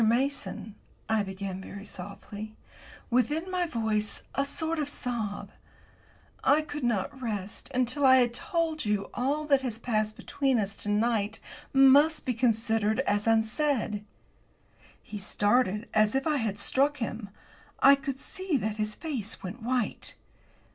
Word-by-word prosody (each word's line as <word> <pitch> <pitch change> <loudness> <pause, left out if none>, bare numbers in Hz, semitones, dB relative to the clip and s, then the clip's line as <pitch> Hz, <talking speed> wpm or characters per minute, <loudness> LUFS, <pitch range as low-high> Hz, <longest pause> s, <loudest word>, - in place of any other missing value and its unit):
Mason," 235 -1 0 0.3
I 220 -1 +2
began 190 -1 -5
very 200 +1 -9
softly, 205 +2 -8 0.6
with, 250 +3 +3
in 325 +5 -2
my 360 -1 0
voice, 220 -5 -1
a 275 - +1
sort 320 +3 -2
of 290 -1 -1
sob, 230 -7 -3 0.9
"I 295 +3 +4
could 295 -2 -6
not 240 +4 -1
rest 210 -2 -4
until 255 +2 0
I 260 -1 +8
had 245 -2 +4
told 325 - -1
you 210 -2 -1
all 285 +5 0
that 280 -3 +4
has 245 -4 -3
passed 215 -2 -1
between 270 -3 0
us 200 -1 -2
to 210 - -2
night 210 0 +1 0.3
must 280 +3 +6
be 255 - +1
considered 225 -1 +1
as 205 -4 0
unsaid." 225 -1 +1 1.0
He 210 - -7
started 210 +1 +1
as 215 +2 +3
if 270 - +1
I 305 -2 +2
had 220 -5 -1
struck 275 +8 +1
him. 225 -4 -4 0.5
I 275 - +8
could 275 -1 -2
see 375 -3 -2
that 215 -3 -2
his 215 0 -2
face 255 - -4
went 195 +6 -6
white. 245 -1 0
235 Hz, 150 wpm, -28 LUFS, 210-275 Hz, 1.0 s, I